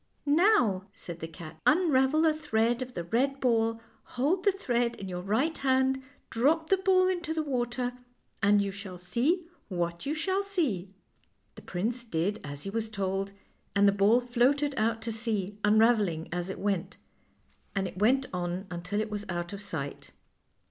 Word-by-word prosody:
" - - -43
Now," 285 - +3
said 170 -1 -8
the 160 - -5
cat, 160 0 -11
" - - +1
unravel 310 -2 +4
a 315 - +4
thread 240 -5 0
of 250 -1 -6
the 175 - -3
red 265 +10 0
ball, 225 -3 +2 0.4
hold 325 +9 +2
the 400 - +6
thread 245 -11 0
in 195 - -7
your 180 -1 -4
right 235 - +1
hand, 265 0 +2 0.3
drop 315 +8 +2
the 385 - +6
ball 370 -1 +4
into 345 -3 -1
the 315 - 0
water, 245 -2 -1 0.5
and 205 0 +4
you 200 - -2
shall 195 -2 -8
see 265 - 0 0.2
what 170 +2 -2
you 300 - 0
shall 375 +5 0
see." 305 - -1 0.6
The - - -12
prince 230 +7 -3
did 200 0 -1
as 145 0 -6
he 195 - -4
was 225 0 -2
told, 195 -1 -2 0.4
and 200 0 +5
the - - +6
ball 205 +4 +4
floated 260 +4 +2
out 225 0 0
to 230 - -2
sea, 210 -3 -2
unraveling 210 -6 +3
as 175 +1 -2
it 190 - -4
went, 195 -2 -2 0.8
and 195 -1 0
it 180 +1 -8
went 260 +6 +3
on 180 +1 -2
until 180 +4 -3
it 215 0 -4
was 210 -1 -3
out 175 +1 -3
of 200 - -6
sight. 160 -9 -5
225 Hz, 180 wpm, -29 LUFS, 195-275 Hz, 0.8 s, the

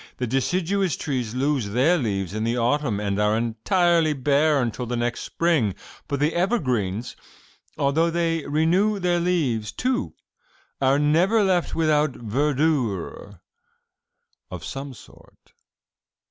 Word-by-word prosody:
The 125 - -2
deciduous 175 - 0
trees 125 -6 -3
lose 135 -4 0
their 130 - +3
leaves 100 - -2
in 110 +1 -2
the 115 +2 0
autumn 120 -2 0
and 100 -1 -2
are 105 +1 +2
entirely 155 - +2
bare 145 +2 +2
until 120 0 -2
the 120 - -2
next 120 0 -1
spring, 155 - 0 0.3
but 140 - -2
the 150 +3 +1
evergreens, 125 - -1 0.6
although 150 +4 +2
they 165 -1 0
renew 175 +8 +2
their 175 -2 +1
leaves, 140 - 0
too, 255 +1 -2 0.7
are 135 +1 +3
never 170 +9 +3
left 185 -3 +1
without 155 -3 +2
verdure 120 - -1 1.1
of 90 -4 -7
some 135 -1 -6
sort. - - -19
140 Hz, 125 wpm, -23 LUFS, 115-165 Hz, 1.1 s, their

